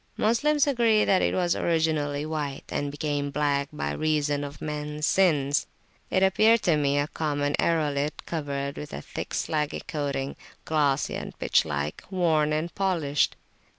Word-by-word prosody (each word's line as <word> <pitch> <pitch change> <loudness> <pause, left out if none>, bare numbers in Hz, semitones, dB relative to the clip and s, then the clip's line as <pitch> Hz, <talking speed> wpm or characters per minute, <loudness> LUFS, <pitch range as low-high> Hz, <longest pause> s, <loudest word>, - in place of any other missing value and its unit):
Moslems 285 +7 +3
agree 235 -6 +3
that 190 - +3
it - - +1
was 175 -2 +1
originally 155 -3 0
white, 150 -3 -3
and 145 - -2
became 145 0 -2
black 140 -1 0
by 75 0 -3
reason 145 - 0
of 145 0 -7
mens 150 0 -3
sins. 150 -8 +2 0.4
It 190 - +2
appeared 215 +4 +4
to 170 - +3
me 145 -1 +1
a 145 - +2
common 145 -2 -1
aerolite 150 -3 0
covered 140 -3 -3
with 150 - -7
a 70 - -5
thick - - -6
slaggy 150 -2 -2
coating, 140 -2 -3 0.3
glossy 145 -3 +1
and - - -6
pitch - - +2
like, 75 0 -3
worn 160 -5 +2
and 155 +3 -1
polished. 165 -8 +1
150 Hz, 150 wpm, -26 LUFS, 145-170 Hz, 0.4 s, appeared